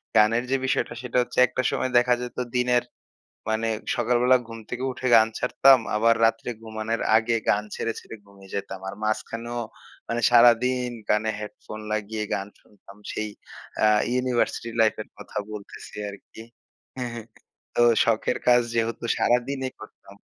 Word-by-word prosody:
গানের 115 +3 +4
যে, - - +4
বিষয়টা 125 - 0
সেটা 125 0 -3
হচ্ছে - - -6
একটা 130 - -2
সময় 130 - -1
দেখা 125 0 +4
যেত 125 -1 -7 0.2
দিনের 125 0 +2 0.7
মানে 110 +1 0 0.3
সকালবেলা 125 +1 +3
ঘুম 115 0 -8
থেকে 125 +1 -4
উঠে 130 0 -4
গান 110 0 +6
ছাড়তাম। 130 +1 +5 0.2
আবার 115 +1 +4
রাত্রে 115 +1 0
ঘুমানোর 110 0 -3 0.2
আগে 115 +1 +1
গান 105 - +3
ছেড়ে, 115 - -2
ছেড়ে - - -11
ঘুমিয়ে 100 -1 -16
যেতাম। 95 -1 -4
আর 100 - -7
মাঝখানেও 115 +2 -3 0.5
মানে 120 0 -2
সারাদিন 125 +1 +5 0.2
কানে 110 +1 +2
হেডফোন 105 +1 -8
লাগিয়ে 110 0 -3
গান 95 +2 -2
শুনতাম। 100 -1 -18
সেই 110 0 -3 0.5
আ - - +6 0.3
ইউনিভার্সিটি 125 -2 0
লাইফ 110 - +3
এর - - -10
কথা - - -9
বলতেছি 105 -2 -9
আরকি। 100 +2 -12 0.6
হ্যা, 125 -1 -2
হ্যা, 115 - -6 0.5
তো - - +3 0.2
শখের 115 +2 +1
কাজ 125 0 +6
যেহেতু 115 +1 -1
সারাদিনই 130 +2 0
করতাম। 100 -2 -14
115 Hz, 150 wpm, -25 LUFS, 110-125 Hz, 0.7 s, গান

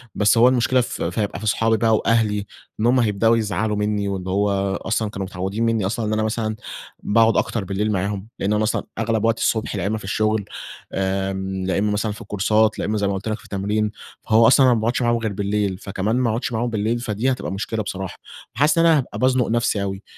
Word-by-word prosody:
بس 105 +2 +3
هو 120 - +7
المشكلة 125 0 +3
ف - - -5
ف - - -2
هيبقى 100 -2 -2
في 110 - -7
صحابي 110 +1 +2
بقى 110 0 +3
وأهلي 105 -2 +1 0.3
إن 110 - 0
هم 125 +2 +4
هيبدأوا 115 0 +3
يزعلوا 110 0 -1
مني، 105 -1 0
وإن 95 -2 -4
هو 100 0 0
أصلًا 110 -1 -1
كانوا 95 -2 -5
متعودين 95 +4 -3
مني 115 -3 +1
أصلًا 110 +3 -2
إن 105 - -1
أنا 110 0 +1
مثلًا 110 0 -1 0.5
باقعد 110 +1 +3
أكتر 115 - 0
بالليل 100 +3 -1
معاهم، 100 +1 -2
لإن 100 +2 0
أنا 105 0 +1
أصلًا 110 - 0 0.2
أغلب 110 -1 0
وقت 115 0 +2
الصبح 110 -1 0
لإمّا 100 +3 -1
في 105 - -10
الشغل، 110 +1 0 0.5
آمم، 95 0 -2
لإمّا 100 +3 0
مثلًا 105 +1 -1
في 105 - -9
الكورسات، 105 +2 +1
لإمّا 105 +1 -1
زي 100 -1 0
ما 100 - 0
قلت 95 +3 -5
لَك 110 - -1
في - - -17
التمرين. 105 +2 -1 0.3
فهو 115 +1 +5
أصلًا 130 +3 +6
أنا 125 - +5
ما 115 - +1
بأقعدش 120 +4 0
معاهم 120 -1 +2
غير 110 -3 -3
بالليل، 100 -1 -1
فكمان 100 +2 -2
ما 125 -1 +1
أقعدش 115 +3 -2
معاهم 115 +2 -1
بالليل، 110 +1 -1
فدي 120 +2 -1
هتبقى 125 - -3
مشكلة 110 +3 -3
بصراحة، 95 -2 -5 0.4
فحاسس 150 +6 +3
إن 165 - +4
أنا 165 -2 +6
هابقى 135 - -4
بأزنق 130 -1 +2
نفسي 115 -3 +1
أوي، 95 0 -4
110 Hz, 220 wpm, -22 LUFS, 100-115 Hz, 0.5 s, هو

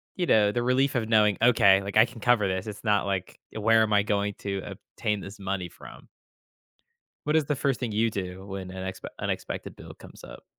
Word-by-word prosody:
you 180 - -1
know, 105 -8 +4
the 120 +3 -1
relief 130 +2 +2
of 115 -3 0
knowing, 105 -3 +3
"Okay, 100 -5 +5
like 100 +1 -2
I 110 - +8
can 120 0 -12
cover 120 -4 +3
this," 95 0 -2
it's 105 -1 -8
not 105 -3 +2
like, 95 -2 -3
"Where 110 +1 +3
am 110 -1 0
I 100 0 +4
going 105 0 -1
to 100 -1 -3
obtain 105 -1 -4
this 100 +2 -10
money 95 -2 -3
from?" - - -14 1.2
What 150 - +1
is 155 -3 +3
the 145 - -1
first 135 -2 -1
thing 125 -3 -2
you 110 +2 +1
do 95 -2 -6
when 95 -2 -6
an 95 0 -6
expe 95 - -7
unexpected - - -4
bill - - -12
comes - - -15
up? - - -12
105 Hz, 215 wpm, -26 LUFS, 100-115 Hz, 1.2 s, I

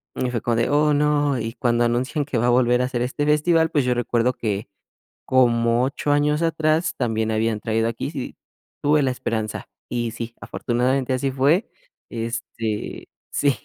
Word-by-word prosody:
Y 125 - -1
fue 120 -3 -2
como 120 +1 0
de: 115 - +1
"Oh 150 +1 +3
no", 145 -2 +2
y 115 0 -4
cuando 120 -2 +1
anuncian 130 +5 0
que 135 -4 -2
va 120 - +2
a - - +4
volver 125 0 +3
a - - +2
hacer 125 -2 -2
este 130 +4 -1
festival, 160 +2 +3
pues, 145 -4 +1
yo 125 - +2
recuerdo 120 0 +1
que 105 -3 -3 0.6
como 120 -2 +3
8 140 +2 -1
años 150 +1 +2
atrás 160 0 +1
también 110 -3 0
habían 110 0 0
traído 115 +1 0
a 115 - -1
Kiss, 115 - -5
y - - -5 0.5
tuve 150 0 +3
la 130 - +1
esperanza. 110 -3 -3 0.2
Y 120 -1 -2
sí, 115 0 -6
afortunadamente 130 +2 0
así 130 +2 0
fue, 140 - +2 0.4
este, 115 -2 -4 0.2
sí, 140 -2 +1
125 Hz, 180 wpm, -22 LUFS, 115-145 Hz, 0.6 s, a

